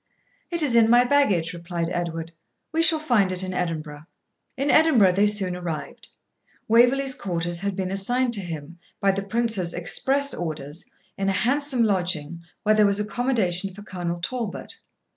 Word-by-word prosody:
'It 340 -2 +1
is 260 -5 +2
in 225 -1 +5
my 240 +1 +6
baggage,' 210 -12 +2
replied 170 -1 -4
Edward; 165 -1 -4 0.4
'we 325 +1 +1
shall 330 -1 +5
find 240 -11 +1
it 185 0 -2
in 185 0 -4
Edinburgh.' 155 -4 -4 0.5
In 275 +2 +1
Edinburgh 260 - +5
they 200 +3 +2
soon 195 -4 +1
arrived. 170 -4 -6 0.6
Waverley's 250 +4 +4
quarters 175 -5 -3
had 200 +1 -3
been 190 -1 -3
assigned 245 +6 +1
to 205 - 0
him, 165 -1 -8 0.2
by 195 - +3
the 195 +1 -3
Prince's 200 -4 -1
express 265 +12 +1
orders, 155 -2 -6 0.3
in 195 0 0
a - - +1
handsome 265 +3 +1
lodging, 175 -6 -1 0.2
where 215 - +3
there 215 -1 +4
was 200 0 +1
accommodation 210 -5 0
for 205 - -11
Colonel 175 -3 -5
Talbot. 230 +3 -5
195 Hz, 160 wpm, -24 LUFS, 175-240 Hz, 0.6 s, my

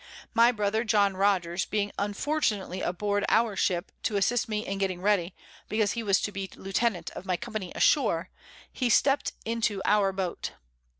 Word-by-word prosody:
My 235 +1 +6
Brother 215 0 0
John 205 -3 +2
Rogers 185 -3 +1
being 205 -1 -1
unfortunately 205 - -1
aboard 205 +3 -1
our 225 -2 +3
Ship, 180 0 0
to 210 - -1
assist 230 +4 +1
me 215 0 -2
in 195 0 -3
getting 190 -2 -1
ready, 190 -2 +1 0.3
because 215 -1 +1
he 235 - -3
was 200 -3 +2
to 210 - -2
be 195 -1 -5
Lieutenant 195 -2 -1
of - - -8
my 180 -1 +1
Company 215 -5 -5
ashore, 185 - +2 0.4
he 250 -2 0
stept 275 +4 +3
into 220 -3 0
our 205 -2 +3
Boat. 190 -2 -4
205 Hz, 165 wpm, -28 LUFS, 190-225 Hz, 0.4 s, My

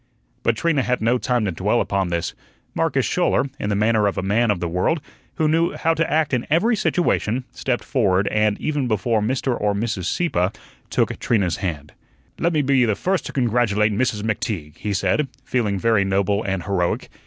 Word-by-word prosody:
But 115 -1 +1
Trina 165 -2 +1
had 125 0 0
no 120 +3 +2
time 120 -3 0
to 95 - 0
dwell 80 - 0
upon 95 -1 0
this. 85 -1 -2 0.4
Marcus - - +1
Schouler, 135 - +1
in 105 - -2
the 100 - +1
manner 105 0 +2
of 100 - -2
a - - -1
man 110 +4 +2
of 100 -4 +1
the 85 - -2
world, 90 - 0 0.4
who 155 - +1
knew 165 +2 +2
how 165 0 +1
to 165 0 -1
act 155 -2 +1
in 125 -2 0
every 200 +10 +3
situation, 130 - 0
stepped 125 -2 -2
forward 100 -7 +1
and, 105 -1 +1
even 145 -4 -1
before 110 0 +1
Mr. 130 +3 0
or 105 -1 +1
Mrs. 100 -4 -2
Sieppe, 90 - 0 0.4
took - - 0
Trina's 95 -8 +1
hand. 75 -6 -4 0.5
"Let 170 - +2
me 155 -3 +1
be 135 -2 +3
the 110 -4 +1
first 185 - -1
to - - -6
congratulate 110 -4 +1
Mrs. 105 -2 0
McTeague," 105 - -3
he 105 - -3
said, 100 +9 +1 0.2
feeling 110 -6 0
very 110 0 +2
noble 100 +1 +1
and 95 -3 -2
heroic. 90 -3 -1
110 Hz, 195 wpm, -22 LUFS, 100-130 Hz, 0.5 s, every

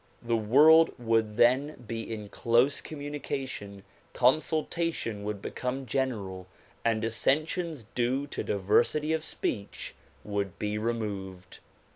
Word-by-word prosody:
The 115 0 +1
world 150 +9 +6
would 115 -3 +1
then 130 +5 +4
be 115 +1 -3
in 105 -2 -5
close 120 +7 +2
communication, 135 -9 -5 0.3
consultation 155 -4 +1
would 105 -1 -4
become 130 +1 -3
general 110 -8 -2 0.4
and 115 -1 +1
dissensions 155 +4 0
due 125 +3 0
to 145 - -5
diversity 120 +10 +2
of 160 -1 -1
speech 100 -9 -4 0.3
would 100 -3 -3
be 105 0 -2
removed. 100 -5 -4
120 Hz, 110 wpm, -29 LUFS, 105-145 Hz, 0.4 s, world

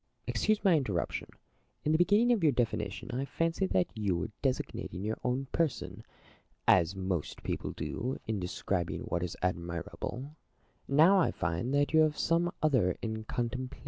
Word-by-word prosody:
Plato. - - -2
Excuse 215 -1 +1
my 190 -4 +5
interruption. 105 - -1 0.6
In 150 - +3
the 160 - +4
beginning 205 +7 +4
of 230 -5 +3
your 155 -3 +5
definition 115 -1 -2
I 130 +2 -1
fancied 165 +6 0
that 90 -1 +4
you 100 -5 0
were 90 +5 -3
designating 130 -7 -2
your 110 +1 -2
own 125 +2 0
person, 165 -6 -1 0.6
as 90 +1 +5
most 95 -4 -3
people - - -3
do 130 +3 -3
in 110 -2 -1
describing 90 -1 -2
what 85 - -2
is 90 -1 -4
admirable; 90 - -3 0.5
now 160 +8 +6
I 180 - +3
find 85 +9 -2
that 145 +2 +2
you 160 - +6
have 155 -1 +3
some 170 +1 +2
other 125 - +3
in 110 -1 -3
contemplation. 125 +2 -3
125 Hz, 165 wpm, -31 LUFS, 95-155 Hz, 0.6 s, now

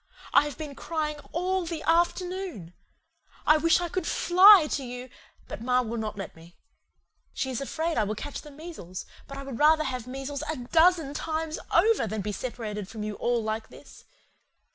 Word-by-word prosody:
I 285 - +6
have 295 - -6
been 300 -3 -6
crying 305 0 -3
ALL 370 +2 0
THE 325 -2 -4
AFTERNOON. 345 - 0 0.7
I 310 - +6
wish 330 +2 +4
I 350 - -2
could 355 0 -3
FLY 370 0 +7
to 280 - -1
you, 250 0 -7 0.4
but - - -7
ma 250 +1 +2
will 230 0 -4
not 215 -2 -4
let 195 -3 -6
me. 165 +1 -16 0.8
She 265 - -2
is 255 - -3
afraid 320 +2 -1
I - - +3
will 210 +1 -2
catch 290 +6 -6
the 300 - -12
measles, 290 - -8 0.2
but 275 - -8
I 275 - -6
would 270 -4 -7
rather 310 +1 +5
have 255 -5 -4
the - - -11
measles 270 +2 -5
A - - -3
DOZEN 320 +3 +3
TIMES 315 +1 -3
OVER 400 - +4
than 215 0 -3
be 210 +2 -3
sepparated 210 -3 -5
from 215 +1 -7
you 210 0 -3
all 235 +2 0
like 220 0 -3
this. - - -15
280 Hz, 190 wpm, -27 LUFS, 230-330 Hz, 0.8 s, FLY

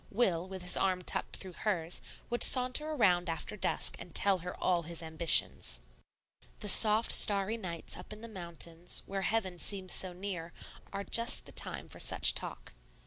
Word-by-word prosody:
Will, 185 -6 0
with 190 -1 -9
his 180 - -1
arm 185 -1 -1
tucked - - -3
through 185 -2 -7
hers, 175 -4 -2 0.3
would 240 - -2
saunter 255 +4 +5
around 180 - +1
after 165 +5 -5
dusk 210 - -1
and 175 -1 -12
tell 195 -2 +3
her 180 +1 -8
all 180 -2 +1
his 170 0 -5
ambitions. 160 - +2 0.8
The 210 - -2
soft, 215 +3 +6
starry 200 0 +4
evenings 185 -7 -5
up 180 - -11
in 215 0 -10
the 230 - -9
mountains, 170 -4 -6
where 195 0 -5
heaven 190 -4 -2
seems 190 -1 -1
so 185 - +2
near, 175 -2 -7 0.4
are 200 0 -5
just 230 +3 +1
the - - -11
time - - -5
for - - -12
such - - +4
talk. - - -6
185 Hz, 175 wpm, -31 LUFS, 170-210 Hz, 0.8 s, soft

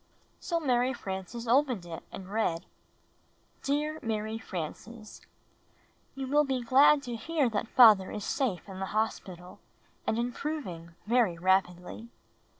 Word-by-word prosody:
So 340 -2 -1
Mary 255 -3 +1
Frances 200 +2 -6
opened 250 -6 +2
it 165 -1 -7
and 190 - -8
read: 175 -7 0 1.0
Dear 300 +2 -1
Mary 220 -1 -3
Frances: 215 +5 -7 0.9
You 270 0 -4
will 295 +3 +3
he 265 -3 -2
glad 280 +4 +5
to 245 -3 -5
hear 290 +4 0
that 215 +1 -2
father 215 -7 +7
is 210 -1 -5
safe 250 - -1
in 190 -1 -8
the 190 - -3
hos 220 +1 +1
pital 180 -1 -12 0.5
and 220 - +1
improving 235 - -4
very 225 -6 +2
rapidly. 185 +4 0
225 Hz, 135 wpm, -29 LUFS, 190-265 Hz, 1.0 s, father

